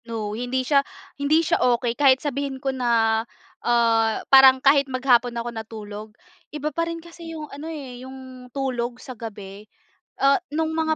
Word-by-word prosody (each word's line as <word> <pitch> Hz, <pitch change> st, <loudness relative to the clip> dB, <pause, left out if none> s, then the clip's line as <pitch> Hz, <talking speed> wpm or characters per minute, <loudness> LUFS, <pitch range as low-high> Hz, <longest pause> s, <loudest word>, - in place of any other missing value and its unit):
No. 220 Hz, -3 st, -4 dB
Hindi 250 Hz, +3 st, -2 dB
siya 280 Hz, +1 st, +4 dB, 0.4 s
hindi 310 Hz, +4 st, +3 dB
siya 335 Hz, -, +1 dB
okey 240 Hz, -1 st, +2 dB
kahit 265 Hz, 0 st, +5 dB
sabihin 280 Hz, -1 st, -3 dB
ko 270 Hz, 0 st, -2 dB
na 230 Hz, -3 st, +2 dB, 0.4 s
ah 230 Hz, -2 st, +2 dB
parang 265 Hz, -1 st, +9 dB
kahit 275 Hz, +1 st, +3 dB
maghapon 250 Hz, -2 st, +2 dB
ako 235 Hz, +1 st, -3 dB
natulog, 215 Hz, -1 st, -8 dB, 0.4 s
iba 300 Hz, 0 st, -4 dB
pa 335 Hz, +2 st, -1 dB
rin 335 Hz, -, -4 dB
kasi 335 Hz, 0 st, -11 dB
yung 305 Hz, -, -6 dB
ano 295 Hz, +3 st, -7 dB
eh, 265 Hz, -6 st, -8 dB
yung 260 Hz, -1 st, -11 dB
tulog 250 Hz, -2 st, -3 dB
sa 255 Hz, -, -9 dB
gabi. 210 Hz, -3 st, -9 dB, 0.5 s
Ah 275 Hz, 0 st, +4 dB, 0.2 s
no'ng 320 Hz, +1 st, -1 dB
mga 315 Hz, 0 st, 0 dB
255 Hz, 165 wpm, -23 LUFS, 235-280 Hz, 0.5 s, parang